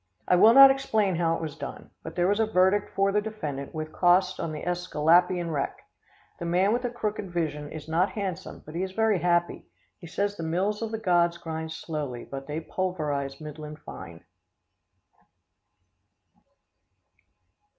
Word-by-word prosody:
I - - +5
will 220 +6 +7
not 275 0 +11
explain 220 -9 0
how 165 -1 +1
it - - -5
was 155 -1 -5
done, 140 -3 -8
but 160 - -8
there 175 0 +2
was 205 +2 +1
a 220 - +2
verdict 195 0 +2
for 195 0 +2
defendant 200 -10 -3
with 155 -1 -5
costs 180 +1 +3
on 165 - -3
the 155 0 -6
Esculapian 175 0 +2
wreck. 145 -3 -2 0.6
The 170 - -4
man 185 +5 +2
with 245 - 0
the 245 - -2
crooked 210 -4 -4
vision 155 -4 -3
is 155 -1 -8
not 170 +4 +1
handsome, 190 -4 -5
but 155 - -10
he 170 - -2
is 190 0 -3
very 220 -2 +2
happy. 175 0 0 0.3
He 170 - -10
says 200 +4 -2
the - - -5
mills 190 +7 -1
of 225 - -2
the 220 - -3
gods 175 -5 +2
grind 160 -1 -5
slowly, 150 -7 -5
but 135 0 -8
they 150 +2 -3
pulverise 150 -7 -3
middling 150 0 -8
fine. 85 - -11
175 Hz, 165 wpm, -27 LUFS, 155-195 Hz, 0.6 s, not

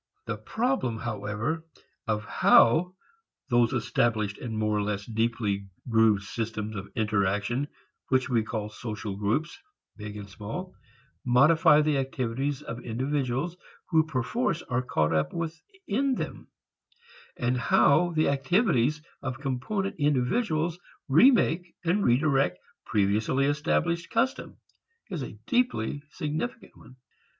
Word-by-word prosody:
The - - -3
problem, 230 - -1
however, 110 +7 -3 0.4
of 105 -1 -1
how 165 +11 +4 0.5
those 120 -2 +3
established 110 -3 0
and 115 -3 -5
more 105 0 +1
or 105 - +1
less 100 -1 -2
deeply 110 -3 -1 0.2
grooved 110 -4 +4
systems 110 0 -4
of 95 -1 -6
interaction 105 +4 0 0.4
which 130 0 +2
we 120 -4 +2
call 110 -1 -4
social 105 -4 -5
groups, 110 +11 -1 0.4
big 105 0 -7
and 100 -1 -8
small, 115 - -7 0.5
modify 150 +4 +5
the 150 -2 +1
activities 135 +2 -2
of 115 -3 -6
individuals 135 +5 -1 0.4
who 160 -2 +5
perforce 165 - -1
are 125 0 -1
caught 80 -11 0
up 80 -1 0
within 260 - -2
them, - - -5 0.9
and 125 +1 0
how 145 +7 +4
the 155 0 +2
activities 150 - +2 0.2
of 130 -2 -4
component 145 +9 -2
individuals 155 - +1 0.3
remake 175 - +4
and 190 +5 +2
redirect 135 -7 +2 0.3
previously 110 +7 +1
established 165 +4 0
customs 260 +4 -1 0.5
is 175 -6 -3
a 110 - -7
deeply 240 - 0
significant 160 +11 -4
one. 130 - -16
130 Hz, 120 wpm, -27 LUFS, 110-160 Hz, 0.9 s, modify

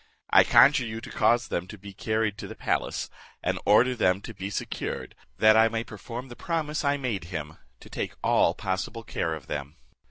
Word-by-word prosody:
I - - +8
conjure 130 -3 +5
you 110 0 -5
to 115 - -10
cause 120 0 +2
them 90 +1 -2
to 105 - -9
be 100 0 -11
carried 110 +1 -1
to - - -6
the - - -9
palace, - - -1 0.4
and - - 0
order 125 +5 +5
them 95 -6 +2
to 115 - -8
be 95 -1 -5
secured, 100 - -4 0.2
that 110 0 +6
I 110 0 +6
may 115 0 -2
perform 115 +4 -8
the 120 - -10
promise 155 -1 -2
I 140 0 +2
made 115 -11 -3
him 80 -3 -6 0.2
to - - -13
take - - -4
all - - +3
possible 95 +5 -3
care 80 -6 -2
of 75 - -10
them." 70 +3 -5
110 Hz, 200 wpm, -27 LUFS, 95-120 Hz, 0.4 s, I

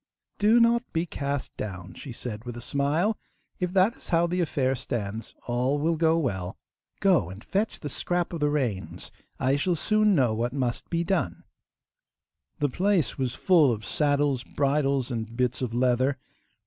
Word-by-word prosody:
'Do 220 +3 +5
not 235 0 +4
be 165 +1 +1
cast 140 -4 -3
down,' 95 -3 -6
she 140 - -9
said 115 -2 -6
with 120 -1 -6
a - - -5
smile; 145 - 0 0.4
'if 180 -1 -1
that 195 +4 +3
is - - -10
how 170 0 +3
the 180 +1 0
affair 135 -5 +1
stands 110 -3 -4
all 125 +4 +1
will 165 +3 +1
go 160 0 +3
well. 95 - -2 0.4
Go 180 - +3
and 95 +4 -10
fetch 210 +3 -1
the 150 - -5
scrap 175 +5 -2
of 170 - -3
the 150 0 +2
reins; 125 -10 -2 0.3
I 135 +2 +2
shall 175 +4 +1
soon 215 +4 +3
know 125 -7 +3
what 120 +3 -1
must 125 -4 -2
be 170 0 0
done.' 170 - -1 1.1
The 145 - +1
place 185 +1 +1
was 130 -2 -1
full 165 -8 +4
of 110 -2 -4
saddles, 145 -5 +1
bridles, 140 -2 0
and 115 -1 -4
bits 125 0 0
of 125 -3 -1
leather. 130 +3 +2
140 Hz, 175 wpm, -27 LUFS, 120-170 Hz, 1.1 s, Do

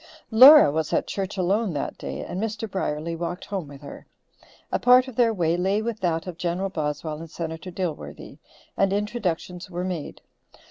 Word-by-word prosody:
Laura 260 - +9
was 155 +1 -2
at - - +1
church 195 0 -4
alone 190 +2 +1
that 145 - -3
day, - - -6
and 185 - -5
Mr. 220 0 -3
Brierly 165 -4 -3
walked 170 +2 -5
home 190 -6 -4
with 140 0 -12
her. 140 - -11 0.6
A - - 0
part 250 +1 +6
of 260 - -9
their 235 -1 +3
way 170 -5 0
lay 190 +4 +1
with 230 -1 -3
that 165 -3 -1
of 175 -2 -8
General 180 +2 -1
Boswell 155 -2 -3
and 165 0 -9
Senator 165 +2 -6
Dilworthy, 175 -3 -6 0.4
and 195 -1 +2
introductions 190 -4 -3
were 175 0 -4
made. 180 -5 -5
180 Hz, 180 wpm, -24 LUFS, 165-210 Hz, 0.6 s, Laura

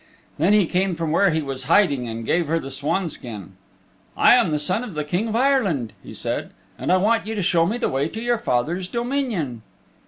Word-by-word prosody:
Then 175 +7 +4
he 210 -3 +5
came 185 +1 0
from 165 -2 -2
where 195 +4 +4
he 160 -2 0
was 135 -2 -5
hiding 145 -7 +3
and 115 0 -5
gave 170 +4 +1
her 165 +2 +1
the 135 -4 -5
swanskin. 140 - -3 0.7
"I - - +7
am - - +4
the 150 - 0
Son 180 +10 -1
of 210 -9 -8
the 150 - -1
King 175 +9 -1
of 220 - -3
Ireland," 215 - +1
he - - -11
said, - - -3 0.3
"and - - -2
I 185 - +5
want 215 +3 +1
you 220 - -3
to 200 - -1
show 170 -2 +3
me 220 +5 -1
the 245 - 0
way 135 +2 0
to 220 - -7
your 240 0 0
father's 170 - -1
dominion." 235 - -2
170 Hz, 220 wpm, -22 LUFS, 145-210 Hz, 0.7 s, I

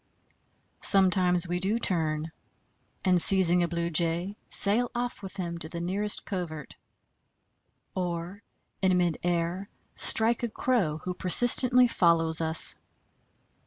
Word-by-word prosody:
Sometimes 185 -2 +1
we 175 +1 -3
do 200 +5 0
turn, 160 -6 -2 0.7
and 180 -2 +2
seizing 180 -2 +4
a 175 - 0
Blue 170 0 -4
Jay, 170 +4 -2
sail 230 +5 +5
off 245 -2 -5
with 195 0 -10
him 170 -2 -6
to 160 - -5
the 170 - -7
nearest 200 +4 -3
covert; 165 -7 -7 1.2
or 180 +2 -5 0.4
in 185 -1 +1
mid 175 -3 -1
air 175 +2 -3 0.2
strike 230 +1 +2
a 235 - -3
Crow 210 -11 -2
who 180 - -5
persistently 245 +7 +3
follows 165 -5 +1
us. 160 0 +3
180 Hz, 125 wpm, -26 LUFS, 170-200 Hz, 1.2 s, sail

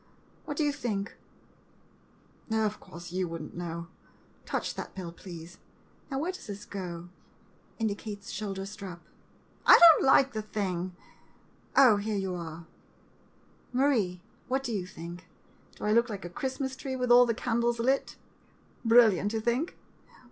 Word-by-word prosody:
What 290 - -5
do 310 - +2
you 295 - +2
think 210 -7 -3 0.7
— - - -25
oh, 220 0 +2
of 210 0 -2
course, 170 0 -10
you 185 0 -1
would 165 -1 -5
n't - - -10
know. 170 -1 -4 0.6
Touch - - -2
that - - -7
bell, 180 -3 -5
please. 170 0 -10 0.5
Now, 270 - -2
where 325 +6 -1
does 370 - -11
this 205 0 -7
go? 175 -3 -6 0.7
[Indicates 205 -2 -3
shoul 200 -1 -4
der 195 0 -4
strap.] 195 -4 -8 0.6
I - - +9
don't 335 -2 +9
like 270 0 +5
the 215 - -2
thing! 185 -4 -3 0.8
Oh, 250 -6 +8
here 210 +1 -2
you 190 -2 -2
are 165 -1 -6 0.5
— - - -33
Marie, 215 -11 +2 0.3
what 265 +1 0
do 240 - -3
you 190 -5 -2
think? 170 0 -9 0.5
Do - - -11
I 210 - +1
look 235 +2 +4
like 200 -4 -5
a 175 - -7
Christmas 265 +4 -3
tree 265 0 -4
with 250 -1 0
all 245 0 +8
the 230 - +1
candles 235 0 0
lit? 260 +4 +1 0.7
Brilliant, 225 -4 +5
you 225 - 0
think? 240 +9 -1
210 Hz, 160 wpm, -29 LUFS, 180-245 Hz, 0.8 s, I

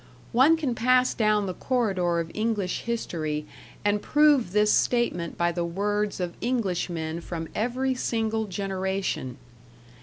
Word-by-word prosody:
One 270 +7 +5
can 290 -6 -1
pass 255 +2 +3
down 215 -2 +2
the 185 - -3
corridor 190 -9 0
of 165 0 -4
English 215 -4 -1
history 155 -10 -2 0.4
and 205 0 +2
prove 295 -9 +4
this 210 +1 +3
statement 205 -9 +1
by 170 0 +2
the 170 0 -2
words 205 +4 -1
of 175 -1 -2
Englishmen 175 -9 -2
from 165 -1 -5
every 255 +4 0
single 225 -3 -1
generation. 190 - -3
205 Hz, 130 wpm, -26 LUFS, 175-235 Hz, 0.4 s, One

